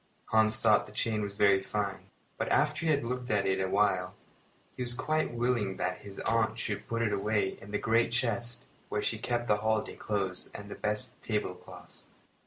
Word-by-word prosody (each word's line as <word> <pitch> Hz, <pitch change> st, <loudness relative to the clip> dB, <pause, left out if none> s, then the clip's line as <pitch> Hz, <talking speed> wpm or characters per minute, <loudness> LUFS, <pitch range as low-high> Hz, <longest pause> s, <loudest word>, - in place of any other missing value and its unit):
Hans 110 Hz, 0 st, +4 dB
thought 110 Hz, -2 st, +4 dB
the -, -, -12 dB
chain 105 Hz, -1 st, -1 dB
very 100 Hz, -1 st, +4 dB
fine; 100 Hz, -1 st, -3 dB, 0.3 s
but -, -, -1 dB
after 150 Hz, +3 st, +2 dB
he -, -, +5 dB
had 145 Hz, -3 st, +2 dB
looked 125 Hz, +1 st, -3 dB
at 105 Hz, -2 st, +2 dB
it 95 Hz, 0 st, +1 dB
a 95 Hz, -, 0 dB
while 95 Hz, -2 st, +2 dB, 0.6 s
he -, -, -6 dB
was 120 Hz, -1 st, -1 dB
quite 155 Hz, +5 st, 0 dB
willing 120 Hz, -5 st, 0 dB
that 90 Hz, 0 st, -1 dB
his 100 Hz, -1 st, -11 dB
aunt 115 Hz, -1 st, +1 dB
should 105 Hz, -3 st, -3 dB
put 115 Hz, 0 st, 0 dB
it 110 Hz, -2 st, +1 dB
away 100 Hz, -1 st, 0 dB
in 95 Hz, -, -11 dB
the 105 Hz, -, 0 dB
great 115 Hz, +2 st, +2 dB
chest 120 Hz, 0 st, -1 dB, 0.3 s
where -, -, -1 dB
she -, -, 0 dB
kept 120 Hz, -1 st, -1 dB
the 105 Hz, -, +4 dB
holiday 110 Hz, 0 st, 0 dB
clothes 95 Hz, -3 st, -2 dB
and 100 Hz, 0 st, -8 dB
the -, -, -5 dB
best 115 Hz, +4 st, -3 dB
tablecloths. 105 Hz, -5 st, -5 dB
110 Hz, 190 wpm, -31 LUFS, 100-120 Hz, 0.6 s, he